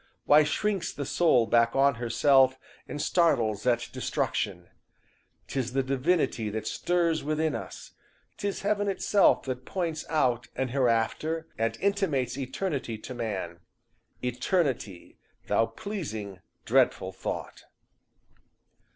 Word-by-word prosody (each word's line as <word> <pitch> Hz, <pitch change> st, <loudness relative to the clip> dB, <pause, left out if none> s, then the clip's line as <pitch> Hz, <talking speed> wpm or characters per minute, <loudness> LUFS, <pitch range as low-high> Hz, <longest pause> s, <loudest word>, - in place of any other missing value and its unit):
Why 150 Hz, +1 st, +7 dB
shrinks 195 Hz, +6 st, -1 dB
the 140 Hz, -, -5 dB
soul 145 Hz, -5 st, +3 dB
Back 115 Hz, 0 st, +3 dB
on 140 Hz, +1 st, +4 dB
herself, 130 Hz, +2 st, +4 dB, 0.3 s
and 150 Hz, -, -6 dB
startles 120 Hz, -, +2 dB
at 120 Hz, -1 st, +2 dB
destruction? 90 Hz, -4 st, -2 dB, 0.8 s
'Tis 130 Hz, -2 st, -3 dB
the 135 Hz, 0 st, +1 dB
divinity 135 Hz, -4 st, 0 dB
that 110 Hz, +1 st, -4 dB
stirs 170 Hz, -2 st, 0 dB
within 155 Hz, +1 st, 0 dB
us; -, -, -7 dB, 0.5 s
'Tis 200 Hz, -1 st, -3 dB
heaven 205 Hz, 0 st, +1 dB
itself 200 Hz, +1 st, +3 dB
that 130 Hz, -1 st, -4 dB
points 165 Hz, -1 st, -3 dB
out 125 Hz, -6 st, +1 dB
an 130 Hz, -1 st, -1 dB
hereafter, 130 Hz, +6 st, 0 dB
And 115 Hz, +1 st, -1 dB
intimates 195 Hz, -12 st, 0 dB
eternity 135 Hz, -, -3 dB
to 120 Hz, +4 st, -8 dB
man, 100 Hz, -8 st, -4 dB, 0.6 s
Eternity! 125 Hz, -, -1 dB, 0.3 s
thou 115 Hz, -, +2 dB
pleasing, 110 Hz, -, -6 dB, 0.3 s
dreadful -, -, +2 dB
thought." -, -, -6 dB
135 Hz, 115 wpm, -28 LUFS, 115-165 Hz, 0.8 s, Why